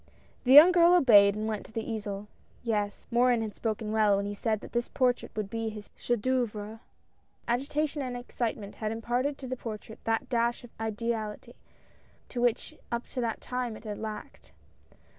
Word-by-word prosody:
The 255 - +5
young 310 +6 +11
girl 350 0 +6
obeyed 205 - +7
and 215 +1 -2
went 215 -2 -3
to - - -17
the 225 0 -4
easel. 210 -2 -4 0.4
Yes, 210 -3 -2
Morin 240 -1 +3
had 215 -2 -5
spoken 215 0 -3
well, 215 -2 +4
when 200 - -1
he 205 - -3
said 215 0 -1
that - - -10
this 240 0 -1
portrait 250 -2 +1
would 215 -2 -2
be 225 +2 -3
his 210 -1 -10
chef 240 -3 -1
d" 255 - -5
oeuvre. 220 -4 -2 0.7
Agitation 285 +5 -1
and 250 -2 -3
excitement 230 -4 -4
had 215 -1 -2
imparted 245 +5 -1
to 265 - -8
the 255 - -3
portrait 220 -2 -8
that 225 0 0
dash 235 0 0
of 240 - -12
ideality 220 -1 -3 0.8
which 240 -2 0 0.2
up 235 0 -2
to 250 - -3
that 230 -2 -2
time 250 -3 -3
it - - -15
had 210 -2 -5
lacked. 215 -1 -8
225 Hz, 180 wpm, -29 LUFS, 215-245 Hz, 0.8 s, young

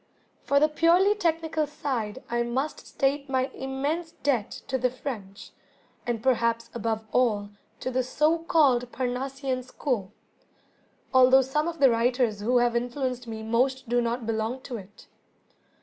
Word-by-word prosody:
For 280 - +3
the 305 - +5
purely 340 +6 +4
technical 325 -5 0
side 260 -6 -3
I 240 0 0
must 255 +5 -2
state 280 +1 0
my 260 0 +1
immense 285 +5 -3
debt 250 -7 0 0.2
to 260 - -1
the 250 +1 +2
French, 220 -6 -7 0.6
and 230 -2 -2
perhaps 230 -2 +1
above 225 -1 -2
all 210 -5 +1 0.3
to 255 - -2
the, 255 0 +1
so 305 +6 +2
called, 270 -7 +3
Parnassian 260 +1 -2
School, 245 -5 -3 1.0
although 260 +1 +7
some 300 +5 -1
of 340 -1 -4
the 275 -4 +6
writers 235 -2 +1
who 240 +5 +2
have 240 -1 +2
influenced 245 0 -2
me 220 -1 -6
most 255 +3 0
do 245 0 +3
not 235 0 -2
belong 225 +3 -2
to 250 -2 -6
it. 205 0 -13
255 Hz, 150 wpm, -27 LUFS, 235-280 Hz, 1.0 s, although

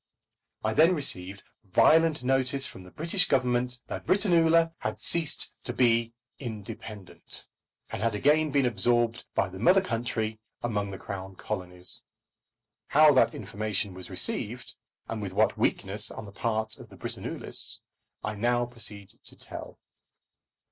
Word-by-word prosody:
I 110 0 +1
then 165 +8 +5
received 95 - +1 0.2
violent 155 - +4
notice 135 +1 +1
from 95 - -6
the 90 - -13
British 170 - 0
Government 125 -1 +1
that - - -6
Britannula 165 -3 +4
had - - -3
ceased 165 -4 +1
to - - -3
be 115 -2 +3 0.3
independent, 110 -4 -6 0.5
and - - -4
had 115 -1 +1
again 150 +7 +3
been 140 -2 +2
absorbed 120 +1 +1
by - - +2
the 95 0 -9
mother 180 - +6
country 115 - -2 0.2
among 105 -4 -1
the 95 - -6
Crown 95 -1 -7
Colonies. 90 0 -3 0.9
How 150 0 +7
that 130 - +4
information 105 -1 -2
was 95 0 -9
received, - - -2 0.3
and 110 -1 -4
with 95 -2 -5
what 110 +3 +3
weakness 105 +3 0
on - - -8
the 100 - -10
part 110 +1 -2
of - - -12
the - - -14
Britannulists, - - -2 0.4
I 105 - -2
now 120 +3 +1
proceed 110 -5 -8
to - - -7
tell. - - -9
115 Hz, 140 wpm, -28 LUFS, 100-140 Hz, 0.9 s, How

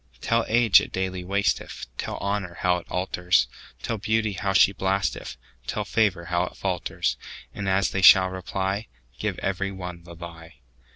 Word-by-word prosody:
Tell 115 0 +1
age 115 -2 +6
it - - -7
daily 95 -1 -3
wasteth; 100 +2 -1
Tell - - -3
honour 100 -3 -2
how 90 -1 +3
it 85 - -11
alters; 90 -1 +1 0.4
Tell 115 -2 -2
beauty 110 +1 0
how 95 +1 -1
she 95 0 +6
blasteth; 95 -2 -2 0.3
Tell - - -2
favour 100 -6 +1
how 90 +1 0
it - - -11
falters:And 95 -2 -3
as 95 +1 +2
they 95 - -1
shall 95 -1 +8
reply, 95 +3 -3 0.3
Give - - -2
every 100 0 -2
one 90 -2 -7
the 85 0 -12
lie. 85 -2 -10
95 Hz, 160 wpm, -25 LUFS, 90-100 Hz, 0.4 s, shall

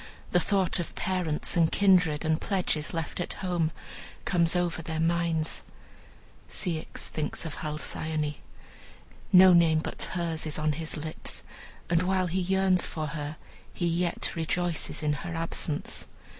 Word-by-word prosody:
The 180 - +5
thought 190 0 +2
of 175 - -4
parents, 180 -5 -1
and 165 -2 +4
kindred, 180 -6 +4
and 160 0 +1
pledges 180 -6 0
left 165 0 -3
at 175 - -2
home, 175 -4 0 0.6
comes 170 -2 +2
over 175 -1 0
their 160 0 -4
minds. 165 -1 +1 0.9
Ceyx 170 -6 -2
thinks 155 +1 -3
of 160 - -5
Halcyone. 155 0 -2 0.9
No 185 0 +9
name 165 -2 +5
but 155 - -3
hers 165 -3 -1
is 150 - -3
on 155 0 +1
his 160 +2 -4
lips, 155 +1 -6 0.4
and 170 0 +3
while 185 0 +2
he 180 +2 0
yearns 190 0 +3
for 155 -2 -3
her, 150 0 -5 0.4
he 175 - -1
yet 170 +1 0
rejoices 170 0 -1
in 150 0 +2
her 165 +3 -5
absence. 165 -2 -2
165 Hz, 145 wpm, -28 LUFS, 155-180 Hz, 0.9 s, No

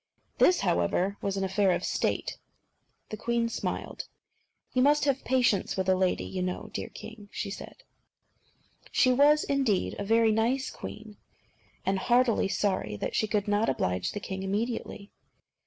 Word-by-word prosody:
This, 360 - +5
however, 180 - +1
was 195 0 -2
an 195 - -1
affair 190 +1 +2
of - - -2
State. - - -1 0.7
The 215 - -5
queen 235 +1 0
smiled. - - -4 0.7
"You 255 - +2
must 290 +2 +4
have 275 -2 +1
patience 245 -8 +1
with 190 0 -1
a 190 - +5
lady, 185 -1 +1
you 185 - -4
know, 180 0 -4
dear - - -4
king," 215 -2 -11
said 200 - -6
she. 395 - -5
She - - +5
was, 295 +3 +5
indeed, 265 -9 0
a - - -2
very 225 +2 +3
nice 240 +5 +1
queen, 215 -1 -9 0.7
and 195 0 +1
heartily 240 -1 +3
sorry 195 - -1
that 100 - -4
she 215 - +1
could 210 -1 0
not 205 +2 +2
oblige 90 -7 -1
the 205 - -3
king 190 -1 -5
immediately. 205 +1 -3
210 Hz, 155 wpm, -28 LUFS, 195-245 Hz, 0.7 s, This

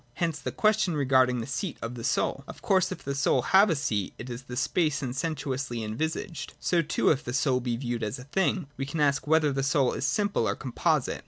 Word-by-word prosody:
Hence 165 -3 -1
the - - -4
question 215 -5 +2
regard 130 -3 +4
ing 125 -1 -1
the - - -4
seat 165 +5 -3
of 115 +1 -5
the 120 -2 -7
soul. 135 +3 0
Of - - -11
course, 190 -6 +2
if 185 - -6
the 140 - -2
soul 135 -2 +2
have 195 +6 +5
a 165 - +2
seat, 105 -8 -2
it 125 +2 -7
is 120 +2 -6
in 125 - -5
space 150 +2 0
and 125 -1 -3
sensuously 135 -5 -3
envisaged. 160 - -4
So, 175 -2 +2
too, 155 - +2
if 145 -2 0
the 120 - -5
soul 130 -1 +2
be 120 -2 -2
viewed 120 -2 -3
as 110 +2 -2
a 125 - -9
thing, 185 +4 0
we 135 - -3
can 155 +3 -4
ask 145 0 +2
whether 155 -1 +4
the 135 0 -1
soul 135 -1 +2
is - - -1
simple 200 - +1
or - - 0
composite. 130 -3 0
140 Hz, 240 wpm, -27 LUFS, 125-160 Hz, -, have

